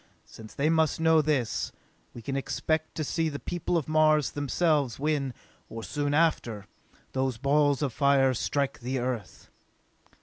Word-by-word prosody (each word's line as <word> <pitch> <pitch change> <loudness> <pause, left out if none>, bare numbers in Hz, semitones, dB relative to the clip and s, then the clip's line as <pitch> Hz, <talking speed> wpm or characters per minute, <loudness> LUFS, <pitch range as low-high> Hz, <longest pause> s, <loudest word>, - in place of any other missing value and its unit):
Since 110 -1 -13
they 140 - +1
must 160 -2 +2
know 160 -1 +5
this, 140 -7 -1 0.4
we 120 - -9
can 135 - -3
expect 155 +3 -2
to 155 - -2
see 160 +2 0
the 145 - -5
people 175 +2 -2
of 160 - -2
Mars 155 -4 +3
themselves 145 -3 0
when, 145 -2 0 0.4
or 115 0 -7
soon 145 +1 -1
after, 120 -10 +1 0.5
those 130 -2 -1
balls 145 +2 +2
of 135 -5 -1
fire 140 -1 +3
strike 140 +2 -1
the 125 +2 -3
Earth!" 120 -5 -4
145 Hz, 155 wpm, -28 LUFS, 130-155 Hz, 0.5 s, know